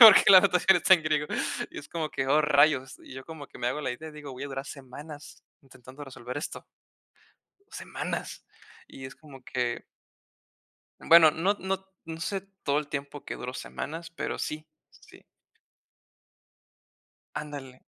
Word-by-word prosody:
porque 220 -4 +11
la 185 -1 +11
notación 185 -1 +5
está 190 - +7
en 165 - -1
griego. 150 -1 +1 0.4
Y - - -8
es 145 - -10
como 160 -2 -2
que, 135 - -2
¡oh, 150 +3 +5
rayos! 145 -2 +3
Y - - -11
yo 130 - -7
como 160 -3 -8
que - - -14
me 120 - -2
hago 150 +5 -1
la 130 - -1
idea 155 +6 -6
y - - -11
digo: 145 -3 -8
"Voy 130 +2 -6
a - - -4
durar 135 0 -5
semanas 145 +3 -10 0.2
intentando 135 +1 -13
resolver 125 0 -6
esto". - - -6 1.1
Semanas, - - -5 0.4
y 135 - -10
es 130 - -9
como 135 -4 -14
que 120 -2 -2 1.2
bueno, 165 -2 +8
no 185 +7 +1
no 190 0 -2 0.2
no 160 0 -6
sé 195 +2 -2 0.2
todo 145 +1 +2
el 150 - -6
tiempo 140 0 -5
que - - -4
duró 125 +1 -6
semanas, 165 +5 -6
pero - - -3
sí, 155 +1 -4 0.2
sí. - - -18 2.1
Ándale. 140 -4 -7
150 Hz, 165 wpm, -28 LUFS, 135-160 Hz, 2.1 s, porque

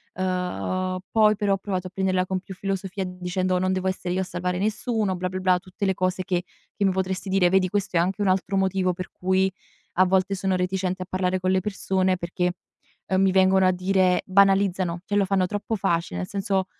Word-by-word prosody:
Uhm, 185 0 -2
poi 215 -1 +4
però 200 -1 +1
ho - - +1
provato 185 -2 -3
a - - -9
prenderla 185 -1 +1
con 185 0 -2
più 190 0 -10
filosofia 195 0 -3
dicendo: 180 0 -1
"Non 185 0 +1
devo 190 0 -1
essere 185 -1 -2
io 190 - +1
a - - 0
salvare 180 0 -3
nessuno, 215 -1 -1
blah-blah-blah" 185 0 0
Tutte 190 +2 -5
le 190 - +2
cose 185 0 -1
che 180 -1 0 0.3
che 200 - 0
mi 190 - +3
potresti 190 +1 -2
dire 190 -2 +3
vedi 185 -1 +3
questo 200 -3 -1
è - - +5
anche 190 +4 0
un - - +1
altro 195 +1 +1
motivo 190 -1 +1
per 180 0 -7
cui 190 +1 +1 0.4
a 185 +1 +4
volte 190 +1 +2
sono 190 0 0
reticente 185 0 -1
a - - -12
parlare 185 0 0
con 185 0 0
le 190 - +3
persone 190 -2 0
perché, 180 +1 -1 0.6
uhm, 190 0 +2
mi 190 -1 +4
vengono 190 0 +4
a - - +5
dire 185 0 +2
banalizzano, 190 -2 +3
cioè 205 - -2
lo 200 - +3
fanno 190 -1 +2
troppo 205 +3 -3
facile, 170 - -1
nel 90 - -3
senso, 195 -1 -1
185 Hz, 210 wpm, -24 LUFS, 185-195 Hz, 0.6 s, è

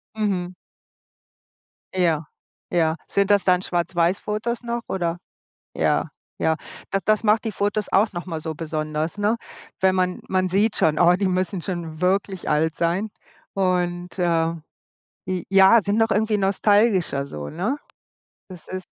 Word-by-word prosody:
Mhm. 190 -5 -1 1.4
Ja, 165 -4 +1 0.4
ja. 160 -2 +2
Sind 200 0 +1
das 205 -1 +4
dann 185 -1 +3
schwarz-weiß 175 +1 0
Fotos 230 +3 -3
noch, 235 0 -3
oder? 175 -2 -1 0.6
Ja, - - +1 0.3
ja. 160 0 +1 0.3
Das 195 0 0
das 215 +1 +2
macht 215 +1 +3
die 220 - -2
Fotos 205 +1 -1
auch 205 +2 +3
nochmal 175 -2 -5
so 160 0 -4
besonders, 155 +2 -3
ne? 210 +3 +2 0.4
Wenn 190 0 +4
man 185 -1 0
man 185 -1 +1
sieht 205 +4 +2
schon: 155 -1 +2
„Oh, 175 0 +6
die 195 +2 0
müssen 185 0 -1
schon 165 -3 -5
wirklich 190 0 0
alt 155 +1 +1
sein 180 +6 0 0.4
und“, 180 -1 -1
äh, 165 -1 +1 0.7
j 185 -2 -2
ja, 195 +3 +7
sind 200 +3 0
noch 225 -1 +2
irgendwie 215 0 +2
nostalgischer 195 -6 +2
so, 75 - -6
ne? 200 - -2 0.7
Das 180 -4 -11
ist 185 0 -5
185 Hz, 145 wpm, -23 LUFS, 170-205 Hz, 1.4 s, ja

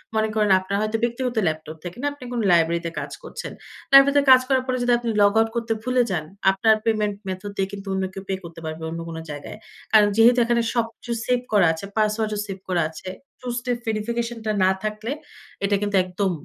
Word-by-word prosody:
মনে 220 0 +2
করেন 210 -1 +2
আপনার 185 +1 -3
হয়তো 215 +1 0
ব্যক্তিগত 245 +1 -1
ল্যাপটপ 155 0 -4
থেকে 175 +4 -7
না, 290 - 0
আপনি 285 - -13
কোন 240 - -1
লাইব্রেরিতে 170 0 +2
কাজ - - -6
করছেন। - - -7 0.4
লাইব্রেরিতে 280 +1 +7
কাজ 255 - +8
করার 260 -1 +2
পরে 255 - 0
যদি 245 - +2
আপনি 235 -1 -3
লগআউট 220 +2 +4
করতে 230 -1 0
ভুলে 255 0 +2
যান, 160 -4 -1 0.3
আপনার 220 +3 +3
পেমেন্ট 210 -2 +1
মেথড 190 +2 -5
দিয়ে 190 0 +1
কিন্তু 200 0 -8
অন্য 190 0 -1
কেউ 195 0 -7
পে - - 0
করতে 165 -1 -10
পারবে, 160 +1 -6
অন্য 165 - -5
কোন 165 - -6
জায়গায়। 145 +6 -8 0.4
কারণ 210 -1 +7
যেহেতু 240 +2 +6
এখানে 235 0 +2
সবকিছু 235 0 -3
সেভ 250 0 +2
করা 195 -5 +5
আছে, 160 - -7
পাসওয়ার্ডও 215 0 0
সেভ 195 -1 -5
করা 175 -2 +2
আছে। 160 +3 -8 0.3
টু 255 - -8
স্টেপ 245 -1 -2
ভেরিফিকেশন 230 +2 -2
টা 215 - +1
না 185 - +5
থাকলে, 215 +2 -3 0.5
এটা 200 +1 +2
কিন্তু 205 -1 +1
একদম 185 +1 -1
215 Hz, 205 wpm, -23 LUFS, 185-235 Hz, 0.5 s, কাজ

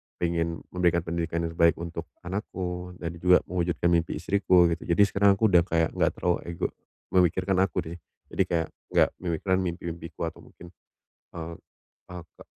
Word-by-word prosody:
pengen 85 -1 -1
memberikan 85 -1 +2
pendidikan 85 0 -2
yang 85 - -2
terbaik 85 0 +4
untuk 85 0 -6 0.2
anakku 90 -1 -5
dan 85 0 -5
juga 90 +1 +5
mewujudkan 85 -1 0
mimpi 85 -1 +1
istriku 90 -3 +3
gitu. 85 - -4
Jadi, 85 +4 +5
sekarang 100 0 +4
aku 110 +1 +2
udah 90 - +7
kayak 80 -2 +1
enggak - - +1
terlalu 90 -1 0
ego 85 -1 -2 0.4
memikirkan 95 +1 +2
aku 95 -2 +1
nih. 85 - -7 0.3
Jadi, 95 - +2
kayak 85 -3 0 0.3
enggak - - +5
memikirkan 95 +2 0
mimpi-mimpiku 85 -2 -5
atau 85 - -4
mungkin, 85 0 -14 0.6
eee, 85 0 -6 0.5
aka 90 -2 -11
85 Hz, 160 wpm, -27 LUFS, 85-90 Hz, 0.6 s, udah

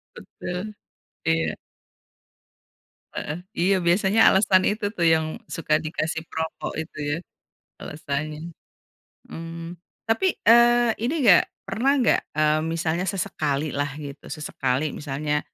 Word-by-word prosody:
Betul, 185 +4 -6 0.5
iya. 80 -1 +1 1.6
Heeh, 155 +4 -4 0.2
iya 190 +3 +3
biasanya 190 +5 +2
alasan 190 -1 +5
itu 205 -1 -1
tuh 175 -6 -1
yang 160 -1 +2
suka 155 -1 0
dikasih 160 0 -3
perokok 160 0 -4
itu 160 0 -6 0.2
ya, - - -4 0.6
alasannya, 150 +2 -5 0.8
mmm, 165 +1 -7 0.2
tapi, 225 - +1
eee, 240 0 +6
ini 245 +7 -1
gak 190 -6 +6 0.2
pernah 270 +5 +1
gak, - - +3
eee, 155 0 +3
misalnya 165 +2 -1
sesekalilah 145 -6 -1
gitu 145 -2 -9
sesekali 145 -1 -2
misalnya, 150 +1 -2
165 Hz, 110 wpm, -24 LUFS, 155-195 Hz, 1.6 s, eee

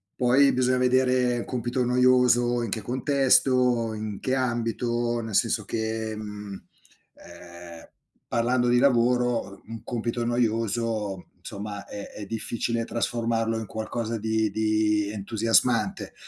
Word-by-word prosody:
Poi 130 +3 +4
bisogna 130 0 +2
vedere 125 -1 +2
un - - -5
compito 125 0 -2
noioso 125 -1 +3
in 115 - -3
che 110 +2 -3
contesto, 125 -2 +2
in 105 -1 -5
che 130 0 0
ambito, 120 -1 -1
nel 110 -3 -5
senso 110 -2 +1
che, 110 0 -3
mhmm, 105 -1 -7 0.6
uhm, 85 -1 -13 0.4
parlando 120 +1 +1
di 120 - +4
lavoro, 125 -5 +1
un 115 0 -8
compito 120 0 -3
noioso 115 -4 -1 0.2
insomma 100 0 -7
è 100 - -8
è 105 - -7
difficile 115 +2 -3
trasformarlo 115 -1 -1
in 110 - -5
qualcosa 115 +2 -4
di 110 0 0
di 110 -1 +1
entusiasmante, 115 - 0
115 Hz, 120 wpm, -25 LUFS, 110-125 Hz, 0.6 s, Poi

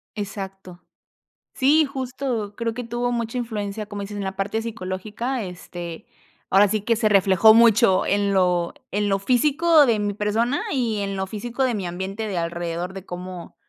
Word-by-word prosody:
Exacto. 195 -3 -7 0.7
Sí, 300 +4 +4
justo. 255 -5 -4
Creo 230 -1 -2
que 245 +1 -5
tuvo 240 +1 -2
mucha 235 +1 -2
influencia, 215 -3 -4
como 205 -1 -7
dices 205 +1 -6
en 200 - -3
la 190 0 -4
parte 205 +3 -2
psicológica. 220 +3 -4
Este, 175 -2 -8 0.4
ahora 200 +2 +6
sí 210 +1 -1
que 230 +2 +1
se 215 -1 +2
reflejó 195 +1 +6
mucho 225 -3 +5
en 200 0 +1
lo 180 -2 +2 0.2
en 205 +1 0
lo 195 0 +1
físico 295 - +4
de 225 -4 +2
mi 205 0 -1
persona 220 +6 0
y 235 -6 0
en 195 -1 -2
lo 190 0 -2
físico 235 +6 -3
de 250 -3 +1
mi 195 -3 -3
ambiente 190 +5 -4
de 195 -4 -3
alrededor, 170 +1 -3
de 195 -1 -9
cómo 180 -1 -8
205 Hz, 175 wpm, -23 LUFS, 190-235 Hz, 0.7 s, ahora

